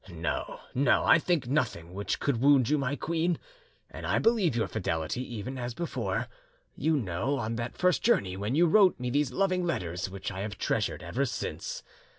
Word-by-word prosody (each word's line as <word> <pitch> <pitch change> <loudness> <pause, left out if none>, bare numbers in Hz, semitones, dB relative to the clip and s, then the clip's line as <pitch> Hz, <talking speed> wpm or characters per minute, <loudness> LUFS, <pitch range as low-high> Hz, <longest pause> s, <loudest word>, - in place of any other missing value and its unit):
"No, 85 -2 -3
no; 135 0 +3
I 160 - +6
think 160 -6 0
nothing 115 - -1
which 100 +2 -2
could 125 -5 0
wound 135 -3 +5
you, 150 - +3
my 140 +1 -1
queen, 170 +2 0 0.5
and - - -10
I - - +1
believe 220 - +3
your 115 - +1
fidelity, 80 0 -2
even 125 +5 -5
as 120 -1 -4
before, 170 -1 -2 0.5
you 160 -1 +1
know, 115 +5 -1
on 115 -2 -2
that 120 0 -4
first 180 -1 +2
journey, 95 - +2
when 105 +6 -2
you 170 +3 +5
wrote 185 0 +5
me 125 0 -2
these 145 -1 +1
loving 185 +5 +1
letters 90 - -2
which 95 +1 -5
I 95 - -6
have 100 0 -4
treasured - - -1
ever - - -1
since. - - -4
125 Hz, 185 wpm, -29 LUFS, 100-160 Hz, 0.5 s, I